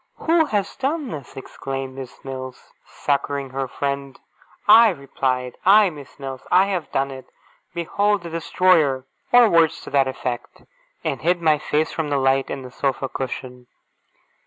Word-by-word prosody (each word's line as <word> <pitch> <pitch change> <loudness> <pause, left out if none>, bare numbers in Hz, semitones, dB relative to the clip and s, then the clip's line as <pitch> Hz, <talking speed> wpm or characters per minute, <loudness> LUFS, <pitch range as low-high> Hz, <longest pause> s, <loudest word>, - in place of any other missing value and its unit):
'Who 325 0 +2
has 205 -8 -2
done 280 +1 -1
this?' 140 -5 -8
exclaimed 135 0 -6
Miss 130 -1 -10
Mills, 130 -1 -8
succouring 140 -1 -2
her 135 0 -2
friend. 140 0 -4 0.5
I 225 +2 +9
replied, 130 -5 -2
'I, 200 0 +6
Miss 145 -4 -12
Mills! 135 -2 -6
I 185 +2 +6
have 185 -5 -3
done 135 0 0
it! 130 -1 -10 0.5
Behold 200 +3 0
the 170 - -7
destroyer!' 165 -5 +2 0.3
or 245 -1 +7
words 165 -4 +3
to - - -10
that 135 -1 +3
effect 125 -2 -5 0.4
and - - -2
hid 175 +1 +2
my 155 -3 +3
face 155 +2 0
from 160 -2 -3
the 145 - +1
light, 135 0 +2
in 135 - -5
the 125 - -10
sofa 135 0 -2
cushion. 125 -1 -6
140 Hz, 160 wpm, -22 LUFS, 135-180 Hz, 0.5 s, I